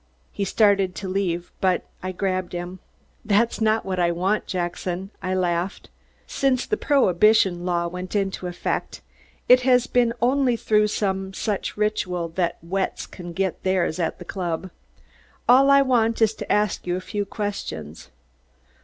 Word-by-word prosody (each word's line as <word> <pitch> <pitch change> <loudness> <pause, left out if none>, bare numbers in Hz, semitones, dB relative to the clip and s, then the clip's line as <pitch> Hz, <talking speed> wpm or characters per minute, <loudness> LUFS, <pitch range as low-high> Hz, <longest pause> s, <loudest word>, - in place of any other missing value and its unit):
He 200 - -2
started 195 -2 +3
to 195 - -5
leave, 180 -2 -2
but 185 -1 +2 0.2
I 185 - -3
grabbed 185 -1 -2
him. 175 +1 -5 0.4
"That's 225 +2 +1
not 220 0 +2
what 185 -1 -2
I 175 -1 +3
want, 190 +5 0
Jackson," 180 +1 -3
I 185 0 -1
laughed. 180 +1 -2 0.3
Since 260 -2 0
the 425 - 0
prohibition 200 - +3
law 170 -1 +1
went 180 +3 -6
into 195 -2 -1
effect, 175 - -3 0.5
it 250 0 +7
has 250 -1 +4
been 245 -2 +2
only 255 0 +2
through 210 -2 +2
some 190 -2 -2
such 210 -1 -3
ritual 185 -5 -1
that 170 0 -1
"wets" 190 +3 -2
can 175 -2 -9
get 190 +1 -2
theirs 185 -3 0
at 165 -2 -1
the 180 - -10
club. 175 -1 -4 0.8
"All 265 +3 +6
I 275 0 +7
want 230 -4 +2
is 225 -1 +3
to - - -6
ask 210 -3 +1
you 175 - 0
a - - -2
few 205 +2 -3
questions." 200 - -5
190 Hz, 155 wpm, -23 LUFS, 180-215 Hz, 0.8 s, it